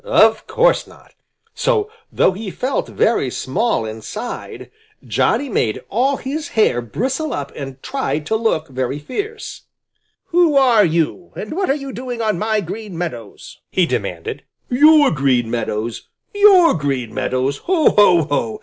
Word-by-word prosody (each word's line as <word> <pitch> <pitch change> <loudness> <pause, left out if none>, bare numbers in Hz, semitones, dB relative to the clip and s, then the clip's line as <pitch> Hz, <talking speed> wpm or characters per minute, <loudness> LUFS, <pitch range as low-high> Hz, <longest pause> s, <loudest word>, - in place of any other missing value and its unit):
Of - - +3
course - - +2
not! - - -19 0.4
So, 445 -4 0 0.2
though - - +3
he 200 +2 -6
felt 255 +8 -2
very 220 - +1
small 155 - -1
inside, 110 - -7 0.3
Johnny 285 - +1
made 115 - -1
all 260 +6 +1
his 305 +4 -4
hair 165 - +3
bristle 260 - -3
up 140 -1 -4
and 135 -2 -8
tried 265 - -2
to 220 - 0
look 220 -8 0
very 130 +1 -3
fierce. 415 - -6 0.6
"Who 340 -3 +3
are 250 -6 +5
you 170 0 -1
and 210 - -6
what 380 +1 -1
are 275 - +3
you 275 -2 -6
doing 245 -1 -6
on 215 -6 0
my 215 0 0
Green 200 0 -7
Meadows?" 120 - -7
he 185 - +2
demanded. 440 - -4 0.3
"Your 295 +3 +6
Green 130 -5 +1
Meadows! 115 -1 -3 0.3
Your 400 -5 +6
Green 135 -7 -2
Meadows! 130 +2 -1
Ho, 350 -4 +3
ho, 180 -5 +5
ho! 120 -7 -2
215 Hz, 150 wpm, -19 LUFS, -, 0.6 s, Your